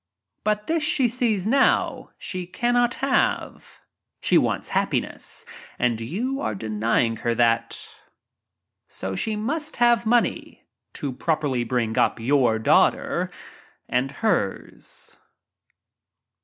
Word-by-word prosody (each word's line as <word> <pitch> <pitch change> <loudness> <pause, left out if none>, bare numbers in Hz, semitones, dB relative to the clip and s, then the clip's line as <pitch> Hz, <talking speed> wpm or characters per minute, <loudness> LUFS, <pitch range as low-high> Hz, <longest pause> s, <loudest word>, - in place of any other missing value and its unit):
But 210 0 0
this 325 0 0
she 275 -4 +2
sees 230 -5 0
now 270 +5 +2
she 185 -2 -5
cannot 240 +4 +1
have. 270 -1 -1 0.4
She - - +1
wants - - +2
hap - - +1
piness—and 125 - -3
you 230 - -3
are 105 - -2
denying 110 +2 0
her 115 +1 -1
that. 115 0 +1 1.0
So 95 0 -5
she 215 - 0
must 300 +8 -2
ft - - -15
THE 240 - +4
"GOLD 240 - +6
DIGGER" 235 +1 +2
47 - - -13 0.3
—to 140 -3 -4
properly 145 -4 -1
bring 115 -2 -1
up - - +2
your 125 -2 +2
daughter 110 - +2 0.6
ners." 135 - -2
180 Hz, 115 wpm, -24 LUFS, -, 1.0 s, GOLD